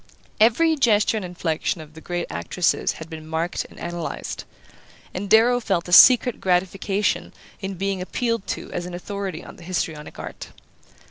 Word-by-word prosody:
Every 315 +9 +4
gesture 220 -5 +3
and 210 - -3
inflection 175 -2 -2
of 155 -1 -11
the 160 - -12
great 175 0 -3
actress's 120 - 0
had 160 - -9
been 160 -1 -9
marked 160 +2 -2
and - - -15
analyzed; 175 -1 -5 0.7
and 195 +2 -4
Darrow 235 +3 +5
felt 190 -7 -1
a 175 - -3
secret 250 +3 +8
gratification 190 +2 0 0.3
in 195 -1 -5
being 195 0 -2
appealed 230 +3 -2
to - - -4
as 175 - -4
an 180 - -6
authority 195 -2 -5
on - - -12
the 175 - -13
histrionic 165 -4 -4
art. - - -8
185 Hz, 160 wpm, -23 LUFS, 170-210 Hz, 0.7 s, secret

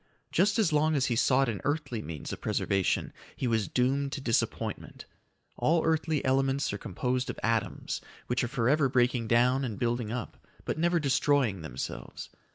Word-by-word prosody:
Just 200 +6 +3
as 195 -8 +2
long 155 +1 +3
as 135 -2 +2
he 120 - 0
sought 135 +3 +3
an 110 -4 -3
earthly 145 -6 -1
means 75 -1 -6
of - - -8
preservation, 95 -2 0 0.2
he - - -3
was 115 -4 +1
doomed 135 +2 +1
to 145 - -3
disappointment. 120 -4 -2 0.5
All 165 +1 +2
earthly 160 -2 +1
elements 135 -1 +1
are 100 - -4
composed 125 +5 -2
of - - -5
atoms 115 -3 -1 0.2
which 125 0 0
are - - 0
forever 135 +3 +2
breaking 125 -2 +2
down 125 +4 +3
and 115 -5 -3
building 120 -2 -1
up, 120 -1 -5 0.3
but - - -2
never 175 +1 +2
destroying 135 - +2
themselves. 65 -5 -6
130 Hz, 165 wpm, -29 LUFS, 115-145 Hz, 0.5 s, Just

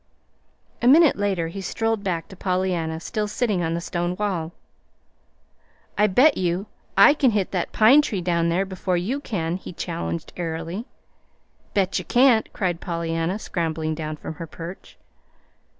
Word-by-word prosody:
A 240 - +2
minute 310 +3 +7
later 195 -5 -1
he 195 +4 -6
strolled 225 +2 -1
back 175 -4 -2
to 190 - -11
Pollyanna 180 -4 -1
still 210 +5 -3
sitting 210 -3 0
on 165 0 -1
the - - -1
stone 175 0 -2
wall. 185 -6 -2 1.4
"I 210 +1 +4
bet 260 +10 +4
you 180 +2 -1 0.3
I 295 - +8
can 285 -3 +3
hit 205 -4 0
that 180 -3 -2
pine 245 +7 +6
tree 210 -9 -3
down 170 -1 +1
there 180 +4 +1
before 185 -1 -2
you 220 +11 -1
can," 175 - -2
he 185 - -9
challenged 85 - -4
airily. 165 +5 -4 0.9
"Bet 195 -2 +1
you - - -7
can't," 245 -3 +4
cried 175 -3 -2
Pollyanna, 165 +1 -2
scrambling 160 -5 -2
down 155 -1 -5
from 160 - -7
her 165 - -5
perch. 170 +4 -10
180 Hz, 155 wpm, -23 LUFS, 165-210 Hz, 1.4 s, I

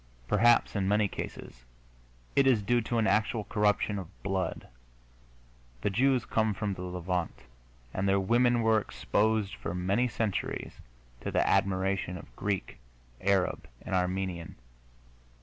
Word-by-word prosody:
Perhaps, 120 0 +4
in 95 -2 0
many 105 +1 +3
cases, - - -7 0.7
it 140 -1 +5
is 115 -6 +4
due 120 +4 +2
to 115 +2 -2
an 110 - +2
actual 110 +1 +1
corruption 105 -1 +1
of 95 - -7 0.2
blood. 95 -1 -2 1.1
The 105 - 0
Jews 130 +3 +2
come 110 -2 +1
from 105 0 -2
the 90 - -8
Levant, 90 -1 -3 0.5
and 100 +1 0
their 100 0 +4
women 120 +4 +3
were 110 -1 +4
exposed 105 +1 0
for 85 - -5
many 100 +7 +1
centuries 110 -3 -3 0.4
to - - -4
the - - +1
admiration 95 -1 +1
of - - -13
Greek, 100 -10 -3 0.4
Arab 95 -2 +1 0.2
and 95 - -6
Armenian. 90 -2 -1
100 Hz, 135 wpm, -30 LUFS, 95-110 Hz, 1.1 s, it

